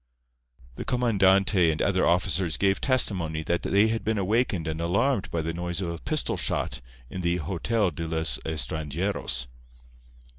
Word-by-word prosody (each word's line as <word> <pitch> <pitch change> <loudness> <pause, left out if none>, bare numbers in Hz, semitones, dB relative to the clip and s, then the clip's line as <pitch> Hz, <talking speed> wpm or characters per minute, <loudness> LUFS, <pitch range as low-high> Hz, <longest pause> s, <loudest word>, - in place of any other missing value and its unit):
The - - -4
comandante 100 -6 +3
and 75 - -4
other 95 -2 +2
officers 90 0 +1
gave 95 0 +1
testimony 90 - +1
that 85 +2 0
they 100 +3 +3
had 115 0 -2
been 110 0 0
awakened 100 -4 0
and 80 +1 -3
alarmed 100 +5 +1
by 85 -2 -2
the 80 +1 -2
noise 85 +1 -3
of 90 -3 -2
a 85 - -6
pistol 155 - -1
shot - - -1 0.3
in 90 - -4
the 85 0 +1
Hotel 95 +5 0
de 80 +2 -5
los 80 -5 -2
Estranjeros. 75 -1 -3
90 Hz, 155 wpm, -26 LUFS, 80-100 Hz, 0.3 s, comandante